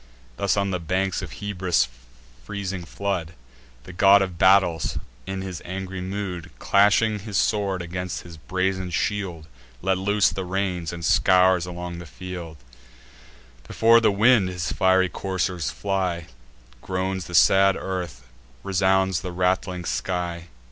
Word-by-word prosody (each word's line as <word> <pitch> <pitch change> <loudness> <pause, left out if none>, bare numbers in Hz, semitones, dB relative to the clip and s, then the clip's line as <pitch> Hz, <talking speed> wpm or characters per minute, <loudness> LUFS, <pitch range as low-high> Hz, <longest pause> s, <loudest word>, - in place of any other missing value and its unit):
Thus, 100 +9 0
on 100 -1 0
the 90 - -1
banks 95 +2 -1
of - - -6
Hebrus' 90 -10 0 0.6
freezing 95 -4 -5
flood, 90 -4 -3 0.5
The 90 - -11
God 100 +2 +6
of 90 -3 -6
Battles, 95 -4 +3 0.3
in 95 0 -4
his 95 -4 -6
angry 95 +1 -5
mood, 90 -2 -5
Clashing 105 +2 +3
his 105 0 -4
sword 100 -4 0
against 90 +1 -5
his 85 -1 -11
brazen 95 +3 -2
shield, 90 -1 -2 0.4
Let 95 0 +1
loose 100 +1 +2
the 95 - -4
reins, 90 -2 -2
and 85 -2 -6
scours 90 0 +4
along 85 -1 -6
the 85 - -9
field: 90 -2 -8 1.1
Before 115 +1 +5
the 110 - +4
wind 105 -1 +4
his 90 -1 -3
fiery 95 0 +3
coursers 90 -3 -2
fly; 95 -4 -2 0.6
Groans 95 -1 -3
the 90 - -5
sad 95 +3 +5
earth, 90 -9 -5 0.4
resounds 95 -1 +2
the 90 0 -5
rattling 90 0 -1
sky. 85 -2 -3
95 Hz, 135 wpm, -24 LUFS, 90-95 Hz, 1.1 s, God